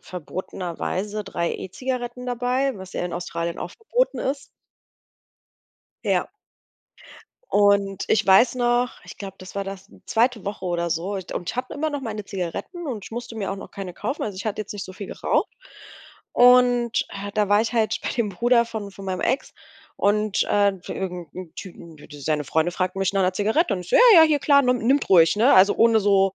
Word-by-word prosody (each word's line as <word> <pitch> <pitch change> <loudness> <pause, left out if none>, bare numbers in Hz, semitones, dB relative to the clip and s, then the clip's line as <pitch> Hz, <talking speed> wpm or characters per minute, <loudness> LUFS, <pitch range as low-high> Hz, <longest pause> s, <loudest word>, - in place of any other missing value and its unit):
verbotenerweise 185 +3 -5
3 170 -3 -2
E-Zigaretten 250 +4 -5
dabei, 250 +2 0
was 190 -1 -10
ja - - -3
in 180 - -4
Australien 170 -1 -4
auch - - -6
verboten - - -1
ist. 275 +1 -2 1.6
Ja. - - +1 1.2
Und 200 -1 +3
ich 215 -1 +2
weiß 235 +6 +5
noch, 245 0 +2
ich - - -11
glaube, 195 -2 -8
das 185 +1 -11
war 200 - -2
das 195 -1 -8 0.2
2. 235 -1 +1
Woche 200 -2 -5
oder 170 -1 -1
so 170 +5 -2
und 190 -2 -5
ich - - -4
hatte 250 - -3
immer 310 +2 -1
noch 290 -2 -4
meine 215 -3 -4
Zigaretten 195 - -5
und 225 -8 -5
ich - - -11
musste 235 0 -7
mir 200 -3 -3
auch 195 - -3
noch - - -10
keine 190 -3 -7
kaufen. 280 - -4
Also, 205 -3 -4
ich 185 - -6
hatte 215 -1 -2
jetzt 205 - -6
nicht 200 - -5
so 185 - -10
viel 195 +1 -8
geraucht. - - -1 0.8
Und, 245 -1 +4
äh, 200 0 -7
da 210 -2 +1
war 205 +1 +4
ich 230 - -3
halt 225 -2 0
bei - - -2
dem 235 -3 -1
Bruder 235 +5 +2
von 215 -3 -6
von 195 0 -11
meinem 185 -1 -2
Ex 260 +3 -1 0.4
und, 210 0 +1
äh 205 -1 +3 0.2
irgend 180 -4 -5
'nem 180 -3 -9
Typen 170 -4 -10
d 145 - -14
d 150 -2 -12
seine 150 0 -1
Freunde 160 +5 +1
fragten 185 +1 -2
mich 195 0 0
nach 195 - +2
'ner 185 0 +2
Zigarette 220 - +1
und 185 - -4
ich 175 - -11
so: - - +3
„Ja, 475 -7 +8
ja, - - +9
hier 310 -2 +4
klar, 280 0 +5
nimm 250 0 +2
nimmt 265 +5 +1
ruhig“, 165 -2 +6
ne? 235 +6 +5
Also, 190 +2 +6
ohne 230 -1 +4
so 195 -1 +3
205 Hz, 205 wpm, -23 LUFS, 185-245 Hz, 1.6 s, ja